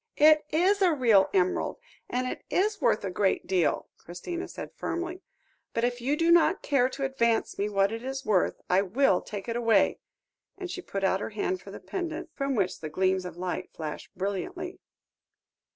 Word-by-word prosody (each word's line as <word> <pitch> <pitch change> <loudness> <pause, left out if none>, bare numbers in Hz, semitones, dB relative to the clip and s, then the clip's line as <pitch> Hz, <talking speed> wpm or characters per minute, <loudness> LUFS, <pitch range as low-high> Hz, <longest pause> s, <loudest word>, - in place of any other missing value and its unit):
"It 305 0 +6
is 375 +6 +2
a 365 -2 +5
real 225 -8 +5
emerald, 185 -1 +1 0.3
and 250 +1 -1
it 255 - -4
is 415 +2 +1
worth 210 - +2
a 190 - -2
great 190 +1 +1
deal," 180 -5 +1
Christina 340 - -6
said - - -8
firmly, 350 +2 -4 0.5
"but 230 - 0
if 245 0 0
you 280 +5 0
do 335 +1 +3
not 345 +3 +4
care 265 -3 +2
to 275 +1 -3
advance 235 -4 0
me 205 +1 0
what 195 0 +2
it 225 0 -4
is 270 +1 -4
worth, 195 -4 +2
I 185 +2 +4
will 200 0 +2
take 205 0 -7
it 230 - -2
away," 230 -1 +3 0.6
and 370 -2 -5
she 370 - -5
put 195 - -5
out 190 0 +2
her - - -4
hand 290 - -2
for - - -12
the - - -8
pendant, 340 -2 -5
from 275 -1 -1
which 190 -4 0
the 155 - -5
gleams 185 +3 +1
of 180 -1 -7
light 185 +1 -3
flashed 155 -2 -6
brilliantly. 350 - -4
240 Hz, 190 wpm, -28 LUFS, -, 0.6 s, It